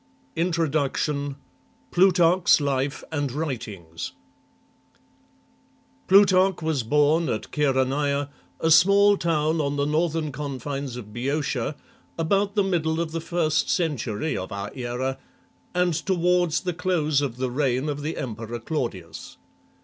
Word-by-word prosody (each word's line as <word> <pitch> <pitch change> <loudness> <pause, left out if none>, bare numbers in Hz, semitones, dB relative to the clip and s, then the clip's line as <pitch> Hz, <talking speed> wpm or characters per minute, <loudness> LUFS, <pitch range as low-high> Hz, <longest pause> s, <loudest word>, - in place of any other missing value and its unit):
INTRODUCTION 150 -4 0 0.6
Prurarcn's 180 -1 +4
Lire 140 -1 -1
anp 145 -3 -1
WriTINGS 105 - -5 2.0
PLuTarcH 190 -2 +5
was 155 -4 0
born 150 +7 +2
at - - -3
Chaeroneia, 140 0 +1 0.3
a 160 - +1
small 200 +5 +6
town 160 -3 0
on 140 -1 -1
the 140 0 0
northern 155 0 0
confines 140 -1 -5
of 105 -4 -9
Boeotia, 140 +2 -2 0.4
about 200 +5 +1
the 205 - +3
middle 165 -4 0
of 170 -1 -2
the 165 0 -3
first 160 -2 0
century 150 - -1
of 95 +2 -5
our 100 0 -5
era, 130 +1 -3 0.6
and 180 -1 +2
toward 180 -1 +2
the 180 +2 -1
close 160 -5 +1
of 130 -4 -3
the 130 -1 -2
reign 130 0 0
of 145 -1 -3
the 155 +3 -4
emperor 115 -1 -5
Claudius. 115 - -5
150 Hz, 120 wpm, -24 LUFS, 130-170 Hz, 2.0 s, small